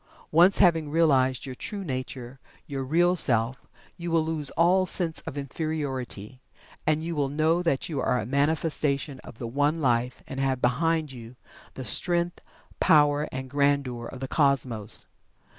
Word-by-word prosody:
Once 175 +5 +5
having 165 -5 +3
realized 135 -6 +2
your 130 - -6
true 200 +9 -6
nature 130 -3 -6 0.3
your 135 -1 -4
Real 175 +6 +2
Self 125 -5 +1 0.3
you 170 0 -5
will 165 -1 +2
lose 155 -3 -1
all 185 +3 +4
sense 170 -3 +1
of 145 - -6
Inferiority, 135 -6 -5 0.5
and 155 0 +1
will 145 -2 0
know 160 +4 +1
that 165 -6 0
you 150 -5 -3
are 125 - +1
a 105 - -4
manifestation 145 0 0
of - - -13
the 120 - -6
One 145 +7 0
Life 125 -3 0
and 135 - -7
have 135 -1 0
behind 155 +5 0
you 120 -1 -11 0.4
the 130 - -6
strength, 175 - +1 0.4
power, 145 -1 +4
and 130 0 -5
grandeur 140 -3 0
of 130 - -10
the 135 - -3
Cosmos. 130 -8 0
140 Hz, 155 wpm, -26 LUFS, 130-160 Hz, 0.5 s, Once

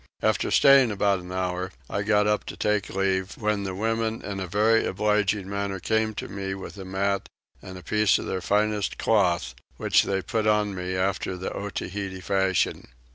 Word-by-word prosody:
After - - +1
staying 135 -3 +6
about 100 -2 +1
an 90 0 -10
hour 90 0 -2 0.2
I 100 - -2
got 105 0 +3
up 105 0 +1
to - - -7
take 105 -1 0
leave, 95 0 0
when 105 -2 -1
the 95 -1 -4
women 115 +2 -1
in 100 -1 -4
a 95 - -4
very 110 +4 +3
obliging 105 -1 0
manner 100 -1 -3
came 110 +2 0
to - - -5
me 95 -1 -4
with 95 - -8
a 95 - -7
mat 100 +1 -1 0.3
and 95 0 -9
a 90 - -11
piece 105 -1 +3
of - - -5
their 95 -1 -3
finest 105 +1 0
cloth, 90 - +1 0.2
which - - +4
they 95 -1 -1
put 110 -1 -1
on 105 -1 +2
me 90 0 -4
after 95 0 -1
the 90 - -4
Otaheite 100 -1 -5
fashion. 95 0 0
100 Hz, 185 wpm, -25 LUFS, 95-105 Hz, 0.3 s, staying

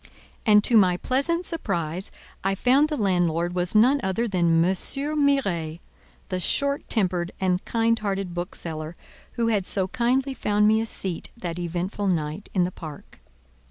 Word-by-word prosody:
And, 210 -1 +6
to 230 - +5
my 180 -4 +4
pleasant 310 - 0
surprise, 175 - -2 0.3
I 195 +1 +1
found 265 +8 +3
the 300 - -2
landlord 175 -4 +1
was 180 +2 -1
none 255 +7 +5
other 225 +4 -1
than 180 -5 +1 0.2
M. 185 - +2
Miret, 275 - 0 0.5
the 185 - -2
short 280 +9 -1
tempered 180 -5 0
and 185 -1 0
kind 230 0 +1
hearted 195 -3 -3
bookseller, 165 -2 -5 0.4
who 230 -1 0
had 205 -4 0
so 190 -2 +1
kindly 255 +3 +1
found 210 -4 +2
me 220 +1 +4
a 225 - -3
seat 185 -5 -4
that 175 -5 -5
eventful 175 +4 -3
night 160 +1 -2
in 180 - +4
the 180 - -1
park. 155 -5 -10
195 Hz, 160 wpm, -25 LUFS, 175-235 Hz, 0.5 s, And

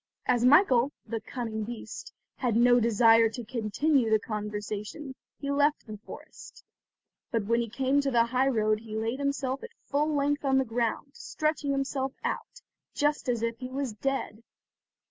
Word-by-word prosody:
As 245 -1 +2
Michael, 265 -2 +5
the 225 -2 -4
cunning 225 -2 -4
beast, 230 +1 -7 0.3
had 240 -4 0
no 245 +1 +5
desire 230 0 +5
to 230 +1 -7
continue 240 +3 +1
the 220 - +5
conversation, 210 +5 -5 0.2
he 280 -1 -3
left 290 +1 +2
the 215 - -7
forest; - - -12 0.7
but 225 -4 -1
when 235 +3 +2
he 230 - -4
came 265 +4 +1
to 280 - 0
the 235 -3 +3
high 255 +3 +1
road 215 -4 +2
he 220 -1 -7
laid 225 +4 -2
himself 275 -1 -1
at - - -8 0.2
full 295 +2 0
length 290 +1 0
on 270 -1 +3
the 265 - +2
ground, 235 +3 -2
stretching 305 -2 -2
himself 270 -1 -1
out, - - -4 0.3
just 295 -2 0
as 235 -2 0
if 230 0 -2
he 255 - -6
was 265 -3 -3
dead. 235 -2 -3
245 Hz, 165 wpm, -28 LUFS, 225-275 Hz, 0.7 s, Michael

